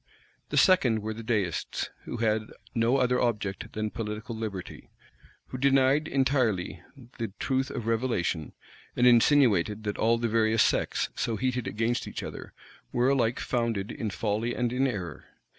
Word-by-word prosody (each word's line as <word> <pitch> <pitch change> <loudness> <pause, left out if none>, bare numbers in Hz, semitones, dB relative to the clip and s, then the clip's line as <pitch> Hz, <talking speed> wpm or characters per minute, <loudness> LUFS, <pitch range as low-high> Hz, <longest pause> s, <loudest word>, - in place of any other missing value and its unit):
The - - -2
second 125 - +4
were 110 0 -3
the 115 - -8
Deists, 105 -7 -2
who - - -5
had 110 -1 0 0.3
no 120 +2 +2
other 125 -1 +2
object 105 -5 -2
than 110 0 -2
political 110 +1 -5
liberty, 105 -5 -6 0.6
who 130 - -6
denied 135 +2 +3
entirely 125 - 0 0.4
the 115 -4 -3
truth 130 0 0
of 120 -5 -5
revelation, 115 - -1 0.4
and 125 - +3
insinuated, 115 -5 +4
that 105 -1 -3
all 115 +1 +3
the 115 0 -1
various 110 0 +3
sects, - - 0
so 115 - -1
heated 125 +1 -1
against 115 +3 -1
each - - -5
other, - - -8 0.4
were 125 +2 +2
alike 120 -4 +1
founded 115 -5 -1
in 110 - -3
folly 110 +3 -1
and 120 -1 -1
in 135 +2 +2
error. 90 - -5
115 Hz, 155 wpm, -28 LUFS, 105-125 Hz, 0.6 s, second